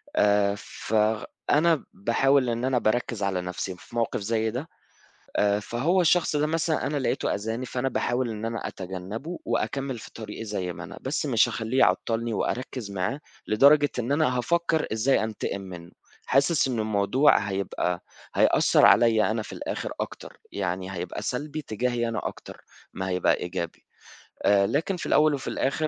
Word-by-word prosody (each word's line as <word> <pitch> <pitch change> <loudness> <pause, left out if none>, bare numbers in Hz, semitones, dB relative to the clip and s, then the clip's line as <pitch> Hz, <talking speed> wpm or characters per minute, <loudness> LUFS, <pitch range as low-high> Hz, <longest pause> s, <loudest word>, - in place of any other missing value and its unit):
آآ، 100 -1 +3
فأنا 110 +10 0
باحاول 130 +4 +2
إن 120 +2 -1
أنا 130 -1 +2
بأركّز 115 -1 0
على 95 -2 0
نَفْسي 90 +1 -4
في 105 - -15
موقِف 115 -1 0
زي 110 +1 0
ده 130 +8 -5 0.7
آآ، 100 0 +2
فهو 135 - +1
الشخص 170 -2 +3
ده 150 +1 +2
مثلًا 160 0 0
أنا 145 - -1
لقيته 130 - 0
أذاني، 110 +5 -3
فأنا 130 +1 -1
باحاول 120 -1 -1
إن 110 0 -5
أنا 115 0 -3
أتجنّبه 95 - -6
وأكمّل 135 -3 -2
في - - -11
طريقي 110 0 -7
زي 95 -4 -3
ما - - -8
أنا - - -9
بس - - -2
مش - - +4
هاخلّيه 115 +4 -2
يعطّلني 115 -1 +2
وأركّز 125 -1 -3
معاه 100 +9 -2 0.3
لدرجة 145 +6 +5
إن 125 +3 -1
أنا 145 -4 +2
هافكّر 170 +4 +1
إزاي 110 +2 +2
أنتقم 105 -2 -3
منُّه 90 -3 -9 0.4
حاسس 135 +1 +3
إنه 115 -4 -1
الموضوع 110 +7 +3
هيبقى 95 -3 -2 0.3
هيأثّر - - +5
عليَّ 110 -2 +5
أنا 110 0 -1
في - - -10
الآخِر - - -4
أكتر، - - -7
يعني 95 -1 -3
هيبقى 90 -1 -5
سلبي 150 +4 -3
تجاهي 120 +1 -1
أنا 115 -2 -3
أكتر - - -11 0.3
ما 95 0 -4
هيبقى 90 -1 +2
إيجابي 85 -1 -5 0.6
آآ 100 -1 +5
لكن 165 - 0
في - - -6
الأول 150 -1 +4
وفي 135 - -4
الآخِر 155 +3 0
115 Hz, 160 wpm, -26 LUFS, 100-135 Hz, 0.7 s, لدرجة